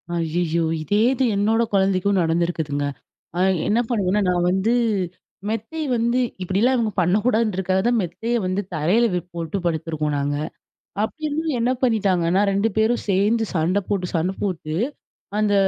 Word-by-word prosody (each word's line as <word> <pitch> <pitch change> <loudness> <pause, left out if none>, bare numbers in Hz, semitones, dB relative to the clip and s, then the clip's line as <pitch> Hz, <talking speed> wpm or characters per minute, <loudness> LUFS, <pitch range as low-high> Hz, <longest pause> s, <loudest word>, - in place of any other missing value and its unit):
ஐயய்யோ! 165 0 0 0.2
இதே 205 +7 +1
இது 260 0 0
என்னோட 220 +3 +2
கொழந்தைக்கும் 195 0 +2
நடந்திருக்குதுங்க. 165 -3 0 0.5
ஆ - - 0 0.3
என்ன 220 - +2
பண்ணுவேன்னா, 205 -3 +1
நான் 175 -1 +1
வந்து 195 +5 +1 0.8
மெத்தை 225 +9 -3
வந்து 235 +2 +1 0.2
இப்பிடிலாம் 205 +8 +2
இவுங்க 225 -3 0
பண்ணக்கூடாதுன்றதுக்காக 190 -1 +1
தான், 240 - +3
மெத்தையை 195 +7 -2
வந்து 185 +2 0
தரையில 180 +10 +3
வி 180 - +1
போட்டு 170 +2 -3
படுத்துருக்கோம் 160 -2 -1
நாங்க. 145 +1 -1 0.7
அப்பிடியிருந்தும் 310 +3 -2
என்ன 240 +2 +2
பண்ணீட்டாங்கன்னா, 195 -6 +2
2 200 +3 +2
பேரும் 220 +2 +2
சேந்து 210 +4 +2
சண்ட 180 +4 +2
போட்டு 195 -3 0
சண்ட 170 +3 +1
போட்டு, 165 -6 -3 0.6
அந்த 210 -1 +2
195 Hz, 135 wpm, -22 LUFS, 170-225 Hz, 0.8 s, தான்